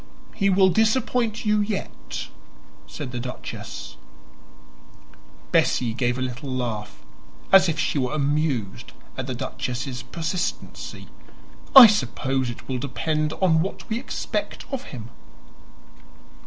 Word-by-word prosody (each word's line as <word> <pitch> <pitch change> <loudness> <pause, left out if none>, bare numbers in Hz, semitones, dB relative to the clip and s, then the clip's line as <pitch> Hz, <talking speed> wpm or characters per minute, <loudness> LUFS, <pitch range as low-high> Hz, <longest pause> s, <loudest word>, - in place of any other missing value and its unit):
"He 195 -1 +1
will 190 0 +5
disappoint 225 +2 +1
you 210 0 +3
yet," 205 -1 -4 0.6
said 130 - -6
the 120 - -4
duchess. 125 +1 -7 1.5
Bessie 120 -3 +2
gave 120 0 0
a 130 - -1
little 130 +2 -5
laugh, 115 -5 -4 0.5
as 190 -2 +7
if 160 - -1
she 155 - 0
were 130 -1 0
amused 140 -8 -1 0.2
at - - -4
the - - -3
duchess's 125 0 -4
persistency. 165 +6 -4 0.7
"I 265 -2 +14
suppose 130 - +1
it 120 - -9
will 130 -1 -2
depend 150 +4 -1
on 160 -3 +5
what 190 - -4
we 225 +1 -1
expect 265 - -4
of 270 -1 -4
him." 115 -3 -9
145 Hz, 120 wpm, -24 LUFS, 125-195 Hz, 1.5 s, I